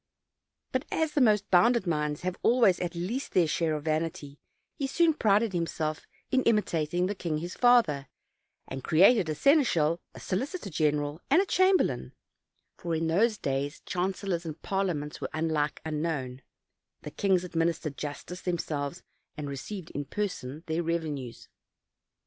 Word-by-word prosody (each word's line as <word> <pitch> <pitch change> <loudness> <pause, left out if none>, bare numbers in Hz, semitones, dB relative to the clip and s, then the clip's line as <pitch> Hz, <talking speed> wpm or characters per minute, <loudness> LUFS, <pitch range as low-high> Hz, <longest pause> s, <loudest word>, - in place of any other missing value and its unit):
But - - 0
as 320 -1 0
the 295 - +1
most 210 -4 +4
bounded 230 +4 +5
minds 150 -3 -1
have 180 0 -2
always 230 -7 +4
at 175 -1 -3
least 205 +11 -3
their 180 - +4
share 160 0 0
of 150 - -5
vanity, 155 -2 -2 0.3
he 275 - -3
soon 330 +3 +3
prided 215 -5 +2
himself 160 -3 -2 0.2
in 260 - +3
imitating 175 -6 +1
the 195 - -1
king 170 -6 -3
his 175 +3 -5
father, 225 - +4 0.6
and 135 -1 -6
created 185 +2 +5
a 155 - -1
seneschal, 170 - +3
a - - -9
solicitor 255 - -3
general, 150 0 0
and 290 +6 +5
a 390 - +3
cham 375 0 +4
berlain - - -2 0.7
(for 170 -2 -2
in 160 +1 -1
those 210 +7 +2
days 140 -1 -3
chancellors 185 -1 -2
and 160 -1 -6
parliaments 175 -7 -2
were - - -3
unlike 155 -2 0
unknown; 150 -5 -3 0.6
the 150 - -7
kings 190 +1 +1
administered 165 -4 -1
justice 150 +5 -6
themselves, 160 -2 -3 0.3
and 150 -1 -4
received 165 +6 -6
in 145 0 -4
person 160 -7 -4
their 160 +1 -1
revenues). 155 -7 -3
170 Hz, 150 wpm, -28 LUFS, 150-205 Hz, 0.7 s, bounded